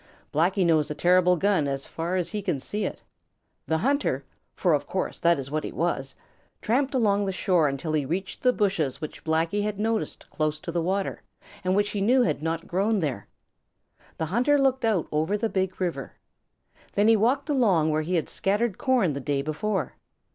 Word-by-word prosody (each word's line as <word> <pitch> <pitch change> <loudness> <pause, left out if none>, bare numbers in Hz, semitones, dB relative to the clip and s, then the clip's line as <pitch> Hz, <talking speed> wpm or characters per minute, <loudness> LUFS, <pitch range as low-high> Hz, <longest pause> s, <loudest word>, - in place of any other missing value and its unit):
Blacky 180 +5 +2
knows 155 -3 +3
a 150 - -3
terrible 180 +1 +4
gun 190 -5 +2
as 135 0 -3
far 170 +3 -3
as 180 -2 -1
he 210 - -3
can 180 -8 -1
see 210 +10 -3
it. - - -5 0.6
The 160 - +1
hunter, 230 - 0 0.3
for 175 -4 +2
of 145 -1 0
course 185 - -3
that 170 -1 +3
is 135 0 -6
what 155 0 -1
he - - -4
was, 140 -5 -2 0.4
tramped 265 +5 0
along 205 -4 +2
the 195 - -1
shore 180 -4 +2
until 140 +3 -3
he 150 -2 +2
reached 180 +7 -4
the 250 - +4
bushes 190 - 0
which 155 - -7
Blacky 165 +5 0
had 210 -1 -2
noticed 220 +1 -2
close 155 0 -1
to 170 - -5
the 170 0 0
water 190 +3 -1 0.4
and 185 +1 +1
which 205 +1 +1
he 205 - -2
knew 250 +5 +4
had 150 -6 0
not 165 +1 -2
grown 200 +4 +1
there. 135 - -3 0.9
The 160 - -1
hunter 245 - +2
looked 265 -3 +2
out 210 -8 +1
over 160 +7 +1
the 220 +2 -1
Big 190 -2 -2
River. 180 -3 -3 0.8
Then 205 +1 +3
he 225 - +6
walked 250 +7 +1
along 200 - +3
where 155 +1 +1
he 175 +4 -2
had 165 - 0
scattered 205 +1 -1
corn 240 - +2
the 140 - -4
day 140 0 -1
before. 190 +7 -2
185 Hz, 200 wpm, -26 LUFS, 155-210 Hz, 0.9 s, he